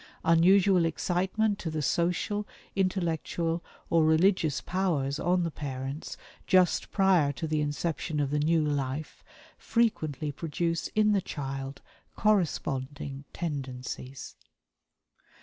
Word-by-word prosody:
Unusual 180 +2 +5
excitement 190 +6 0
to 165 - -3
the 155 -1 -2
social, 180 +6 0 0.3
intellectual 170 -3 -1 0.3
or 165 -1 +5
religious 160 -1 +3
powers 155 -7 -1
on 180 +1 +2
the 165 - -2
parents 135 0 -5 0.3
just 185 -2 +3
prior 185 -7 +4
to 145 +4 -5
the 155 -1 0
inception 150 +1 -2
of 140 -1 0
the 150 - +1
new 160 +1 +3
life 145 0 -3 0.4
frequently 155 - 0
produce 165 +2 -2
in 215 0 +4
the 200 -2 +3
child 135 -3 -5 0.3
corresponding 145 -8 -1
tendencies." 130 -4 -5
160 Hz, 110 wpm, -29 LUFS, 145-185 Hz, 0.4 s, Unusual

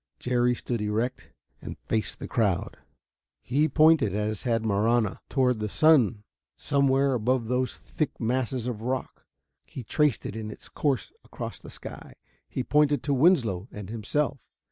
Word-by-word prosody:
Jerry 125 0 +1
stood 120 -2 -3
erect 110 +5 -2 0.3
and - - -7
faced 110 -1 -3
the - - -7
crowd. 105 -9 0 0.6
He 145 +5 +1
pointed, 155 - +4
as 105 0 -2
had 115 -3 0
Marahna, 110 +1 +1
toward 125 -4 +2
the 105 0 -2
sun 125 -8 +4 0.3
somewhere 140 -1 +2
above 125 +1 +1
those 125 0 0
thick 155 - -4
masses 125 +1 -1
of 120 -4 -4
rock; 130 +2 -4 0.4
he 130 - -9
traced 145 +2 +1
it 100 - -5
in 110 -1 -5
its 105 - -10
course 135 -8 -1
across - - -7
the - - -11
sky; - - -9 0.3
he 130 - -3
pointed 145 +2 +2
to 145 - 0
Winslow 125 - +3
and 105 -1 -8
himself. 135 +5 -1
125 Hz, 150 wpm, -27 LUFS, 110-140 Hz, 0.6 s, pointed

